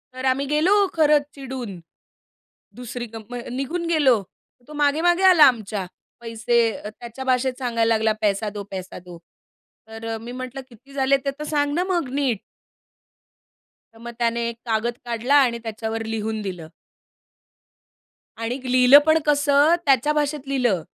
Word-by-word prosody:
तर 255 +1 -6
आम्ही 265 +2 +1
गेलो 300 +6 +1 0.2
खरंच 300 -2 +4
चिडून. 255 -8 -7 1.0
दुसरी 245 0 -6
कम 225 +2 -9 0.2
निघून 275 +7 -3
गेलो. 285 -9 +3 0.5
तो 300 - -11
मागे-मागे 315 +5 +2
आला 365 -5 +7
आमच्या. 215 -7 +2 0.4
पैसे 235 +1 -1 0.2
अ, 210 - -8
त्याच्या 240 +2 -8
भाषेत 260 0 +1
सांगायला 230 -3 0
लागला, 220 0 +1
पैसा 210 +1 0
दो, 205 0 -7
पैसा 185 -1 -7
दो. 175 -1 -10 0.7
तर 225 0 -9
अ, - - -5
मी 235 +1 -8
म्हटलं, 255 +1 -6
"किती 250 +4 -18
झाले 275 0 +2
ते 275 - 0
तर - - -4
सांग 290 -1 0
ना 345 +4 +1
मग 340 -8 0
नीट?" 270 -7 0 1.5
तर 225 - -18
मग 235 +1 -8
त्याने 235 0 0
एक 235 - -7
कागद 230 +1 -1
काढला 240 +4 0
आणि 235 -2 -1
त्याच्यावर 225 0 -4
लिहून 220 0 -3
दिलं. 180 -5 -6 1.7
आणि 230 +3 -3
लिहिलं 255 +2 +8
पण 315 0 +4
कसं 290 +2 +4
त्याच्या 275 +1 +3
भाषेत 295 -2 -2
लिहिलं. 245 -10 +1
250 Hz, 150 wpm, -22 LUFS, 225-285 Hz, 1.7 s, लिहिलं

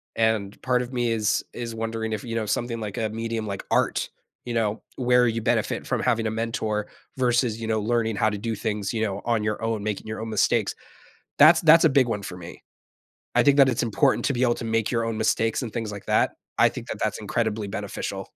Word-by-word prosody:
And 110 -3 0
part 125 -1 +1
of 125 +1 -6
me 120 -2 0
is 110 -2 +1
is 120 -1 -5
wondering 110 0 -3
if, 105 - -4
you 115 -2 -5
know, 110 -1 -1
something, 115 +2 -2
like, 105 -1 -5
a 110 -2 -1
medium 115 0 -3
like 100 -1 -4
art, - - +1 0.4
you 120 - -4
know, 110 -1 0 0.2
where 125 -1 +4
you 115 0 -1
benefit - - 0
from - - 0
having 115 -3 +1
a - - -1
mentor 110 -2 -2 0.3
versus, 120 -3 +1
you 110 - -3
know, 110 -1 +1
learning 115 -1 0
how 110 - +2
to 105 - -4
do 110 +2 -3
things, 105 0 -3
you 110 - -1
know, 100 -2 -2
on 115 -2 +1
your 105 0 -2
own, 115 -2 -1
making 105 0 -3
your 110 - -5
own 115 - -5
mistakes. 110 -2 +1 0.7
That's 160 +3 +8
that's 165 +1 +7
a 160 - +6
big 135 -2 +4
one 105 -3 -2
for 90 -2 -7
me. 85 -1 -11 0.7
I - - +5
think 140 0 +4
that 135 -2 +7
it's 120 -1 0
important 125 +5 +2
to 140 - +1
be 125 +1 0
able 120 - +3
to 115 - -6
make 115 -1 0
your 115 -2 +1
own 115 -1 -2
mistakes 110 +2 +1
and 115 -4 -5
things 115 -3 -3
like 100 -1 -8
that, - - +2 0.3
I - - +6
think - - -8
that - - -5
that's - - -1
incredibly 110 -3 -2
beneficial. - - -4
115 Hz, 235 wpm, -25 LUFS, 110-120 Hz, 0.7 s, That's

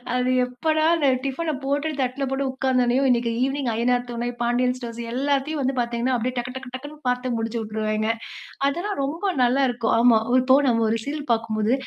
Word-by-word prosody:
அது 250 0 +1 0.2
எப்போடா 310 +6 0
அந்த 300 -4 +1 0.2
டிஃபன 310 +4 -1
போட்டு 285 +3 0
தட்டில 255 +2 -2
போட்டு 270 +1 -1
உட்கார்ந்தோனேயும், 260 0 +1
இன்னைக்கு 235 -1 +2
ஈவினிங் 270 -1 -1
அய்யனார் 245 +2 +1
துணை, 240 +1 -2
பாண்டியன் 245 +1 +1
ஸ்டோர்ஸ், 235 -2 -7
எல்லாத்தையும் 280 +3 0
வந்து 265 0 0
பார்த்தீங்கன்னா, 240 +2 0
அப்படியே 250 +2 -2
டக்கு 250 +1 -3
டக்கு 260 -1 -8
டக்குன்னு 290 +4 -8
பார்த்து 250 0 -1
முடிச்சுட்டுருவேங்க, 220 -1 -2 0.6
அதெல்லாம் 350 +7 -3
ரொம்ப 320 +8 -4 0.2
நல்லாருக்கும், 245 -2 +2
ஆமா 235 -1 +6 0.2
இப்போ 260 +1 +5
நம்ம 230 -2 +2
ஒரு 225 - +1
சீரியல் 290 +1 -5
பார்க்கும்போது, 225 -1 0
250 Hz, 160 wpm, -23 LUFS, 235-275 Hz, 0.6 s, ஆமா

